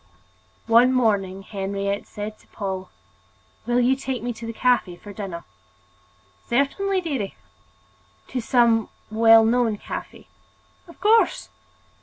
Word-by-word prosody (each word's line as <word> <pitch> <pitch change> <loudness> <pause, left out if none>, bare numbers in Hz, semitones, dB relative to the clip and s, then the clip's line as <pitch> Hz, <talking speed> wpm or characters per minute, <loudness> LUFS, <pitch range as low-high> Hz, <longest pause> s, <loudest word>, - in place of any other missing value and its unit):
One 235 +3 +5
morning 200 -6 +1
Henriette 200 0 -3
said 210 +1 -7
to - - -24
Paul: 190 -3 -5 0.8
"Will 240 0 +2
you 250 +2 +3
take 265 -2 -4
me 245 0 -2
to 230 0 -8
a - - -2
cafe 240 -7 +1
for 205 +3 -12
dinner?" 190 -4 -6 1.0
"Certainly, 370 +10 +1
dearie." 275 - -3 0.9
"To 255 - -2
some 230 -2 +3 0.2
well 225 0 +6
known 230 -2 +2
cafe?" - - -8 0.6
"Of 335 - -15
course!" 440 +4 +3
225 Hz, 120 wpm, -23 LUFS, 200-250 Hz, 1.0 s, well